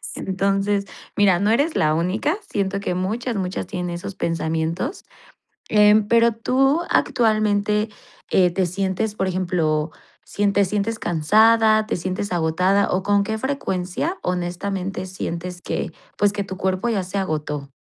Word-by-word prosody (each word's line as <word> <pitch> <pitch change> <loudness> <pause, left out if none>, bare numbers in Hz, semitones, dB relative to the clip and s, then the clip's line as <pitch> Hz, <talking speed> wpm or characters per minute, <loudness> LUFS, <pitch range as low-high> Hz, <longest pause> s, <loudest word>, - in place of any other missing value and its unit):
Entonces, 195 +1 0 0.3
mira, 195 -4 +4
no 205 +2 +1
eres 285 +8 +2
la 155 0 +2
única, 190 - 0
siento 200 -1 -1
que 200 - -2
muchas, 220 +7 -2
muchas 185 -1 -3
tienen 180 -1 -4
esos 175 +3 -6
pensamientos, 165 - -2 0.7
em 210 0 +5
pero 235 +1 +4
tú 270 +7 +2
actualmente, 215 -2 +2 0.4
eh, 180 -2 +4
¿te 185 +1 +1
sientes, 195 +4 -2
por 190 - -1
ejemplo, 170 -4 0 0.3
sientes 200 -1 +1
sientes 210 +2 -1
cansada, 215 +6 +4
te - - -1
sientes 185 +3 -3
agotada 180 +4 +2
o 185 - +1
con 205 0 +3
qué 220 +2 -2
frecuencia 265 - -2
honestamente 180 +2 -3
sientes 180 -1 -5
que, - - -3 0.2
pues, 205 -1 +2
que 205 -1 -2
tu 190 -1 -7
cuerpo 190 +4 -1
ya 205 -5 0
se 185 +2 -5
agotó? 150 -6 -3
195 Hz, 140 wpm, -22 LUFS, 180-215 Hz, 0.7 s, em